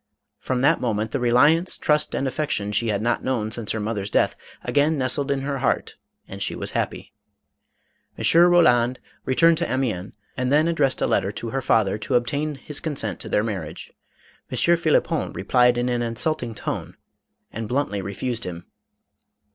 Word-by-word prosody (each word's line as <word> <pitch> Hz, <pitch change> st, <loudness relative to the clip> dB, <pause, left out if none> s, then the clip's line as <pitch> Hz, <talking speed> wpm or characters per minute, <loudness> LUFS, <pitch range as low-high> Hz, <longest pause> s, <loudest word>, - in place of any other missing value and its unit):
From 130 Hz, -1 st, -2 dB
that 155 Hz, +5 st, +3 dB
moment 110 Hz, -2 st, -1 dB
the 140 Hz, -, -1 dB
reliance, 145 Hz, +9 st, +3 dB
trust, 150 Hz, 0 st, +1 dB
and 135 Hz, -, -1 dB
affection 130 Hz, -8 st, -2 dB
she 115 Hz, +2 st, +1 dB
had 105 Hz, -1 st, -1 dB
not 120 Hz, 0 st, 0 dB
known 115 Hz, -5 st, -1 dB
since 115 Hz, -2 st, -3 dB
her 110 Hz, -, -2 dB
mother's 105 Hz, -2 st, -3 dB
death, -, -, +2 dB, 0.3 s
again 150 Hz, +2 st, +2 dB
nestled 135 Hz, +2 st, 0 dB
in 140 Hz, -1 st, 0 dB
her 140 Hz, 0 st, -3 dB
heart -, -, -1 dB, 0.3 s
and -, -, -9 dB
she -, -, -1 dB
was -, -, -5 dB
happy. -, -, -3 dB, 1.0 s
M. -, -, -5 dB, 0.3 s
Roland 125 Hz, -8 st, +4 dB, 0.3 s
returned 165 Hz, +5 st, +4 dB
to 170 Hz, -, -2 dB
Amiens 115 Hz, -8 st, -2 dB, 0.2 s
and 125 Hz, +1 st, -1 dB
then 155 Hz, +3 st, +4 dB
addressed 150 Hz, -6 st, +1 dB
a -, -, +4 dB
letter 100 Hz, -, +1 dB
to 115 Hz, +1 st, -6 dB
her 135 Hz, -, -1 dB
father 110 Hz, -4 st, +2 dB
to 105 Hz, -, -2 dB
ob 120 Hz, 0 st, +3 dB
tain 145 Hz, +3 st, -2 dB
his 140 Hz, +2 st, -5 dB
consent 115 Hz, -, -3 dB
to -, -, -6 dB
their 105 Hz, -, +2 dB
marriage. 95 Hz, -8 st, -6 dB, 0.6 s
M. -, -, -4 dB
Phlippon 170 Hz, -2 st, +2 dB
re 95 Hz, -, -5 dB
plied 125 Hz, +2 st, +4 dB
in 120 Hz, +1 st, 0 dB
an 120 Hz, -1 st, 0 dB
insulting 120 Hz, +1 st, -2 dB
tone -, -, -5 dB, 0.6 s
and 115 Hz, 0 st, -4 dB
bluntly 125 Hz, -7 st, -1 dB
refused 115 Hz, +5 st, -4 dB
him. 85 Hz, -1 st, -6 dB
125 Hz, 180 wpm, -23 LUFS, 110-145 Hz, 1.0 s, Roland